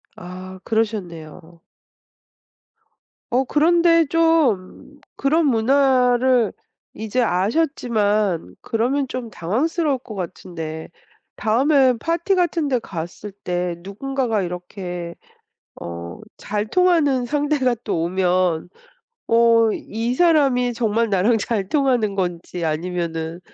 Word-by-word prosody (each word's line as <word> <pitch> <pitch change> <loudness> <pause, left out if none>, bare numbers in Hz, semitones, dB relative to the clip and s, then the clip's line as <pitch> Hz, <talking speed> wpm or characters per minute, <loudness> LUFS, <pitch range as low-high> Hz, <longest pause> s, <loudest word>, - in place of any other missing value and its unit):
아 185 +1 -9
그러셨네요. 175 -7 -4 1.7
어 255 +2 +3
그런데 335 +3 +4
좀 290 - +1 0.2
그런 310 +4 +2
문화를 255 -1 +3 0.4
이제 220 +4 -1
아셨지만 210 - 0
그러면 260 +5 0
좀 250 -2 -5
당황스러울 275 - -1
것 220 -3 -10
같은데 165 -3 -6 0.5
다음에 260 +3 +3
파티 335 - 0
같은데 330 -8 +1
갔을 175 +4 -7
때 180 -1 -2
누군가가 230 +2 -2
이렇게 180 -1 -6 0.7
어 85 0 -7 0.2
잘 210 0 -3
통하는 315 -7 +2
상대가 290 -3 +1
또 175 -6 -1
오면 180 -1 0 0.6
어 230 -1 +4
이 230 +4 -3
사람이 275 -7 +3
정말 230 0 0
나랑 205 +5 +3
잘 200 -3 -2
통하는 250 -8 +1
건지 175 -2 -3
아니면은 165 0 -3
225 Hz, 210 characters per minute, -21 LUFS, 180-270 Hz, 1.7 s, 그런데